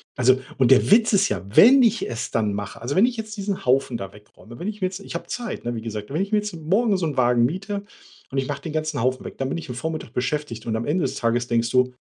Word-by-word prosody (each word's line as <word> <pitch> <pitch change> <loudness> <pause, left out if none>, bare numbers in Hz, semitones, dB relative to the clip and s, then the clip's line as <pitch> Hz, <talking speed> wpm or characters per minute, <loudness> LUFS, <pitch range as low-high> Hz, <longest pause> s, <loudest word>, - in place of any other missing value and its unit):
also, 130 +1 +4 0.2
und 130 - +4
der 135 +7 +5
Witz 225 +2 +6
ist 200 0 +4
ja, - - -2
wenn 265 +5 +8
ich 230 -2 +2
es 115 - -4
dann 105 -3 0
mache, 105 0 -5
also, 125 +5 -3
wenn 195 - +6
ich 245 -1 -2
jetzt 215 -1 -6
diesen 200 -2 -4
Haufen 130 -1 +2
da 95 -2 -7
wegräume, 105 +3 -15
wenn 180 - -4
ich 210 -1 -5
mir 185 - +2
jetzt 185 +1 -7
ich 200 - -9
habe - - -4
Zeit, 240 - -5
ne, 120 - -1
wie 115 - -5
gesagt, 110 0 -6
wenn 160 - 0
ich 200 +1 -3
mir 215 - +3
jetzt 210 -3 -5
morgen 195 +7 +1
so 175 -3 -1
'n 145 - -5
Wagen 120 -1 +4
miete 195 - -3 0.5
und 135 - -4
ich 135 -1 0
mache 145 -1 -4
den 160 - -6
ganzen 155 -3 -2
Haufen 130 +2 -1
weg, - - -8
dann 135 0 -1
bin 150 - -2
ich 165 - -8
'n 125 - -5
Vormittag 155 -2 -5
beschäftigt 125 -2 -3
und 110 - -1
am 110 +1 -2
Ende 165 +4 0
des 135 0 -2
Tages 120 0 0
denkst 115 -1 0
du: 125 0 +2
140 Hz, 290 wpm, -23 LUFS, 120-195 Hz, 0.5 s, wenn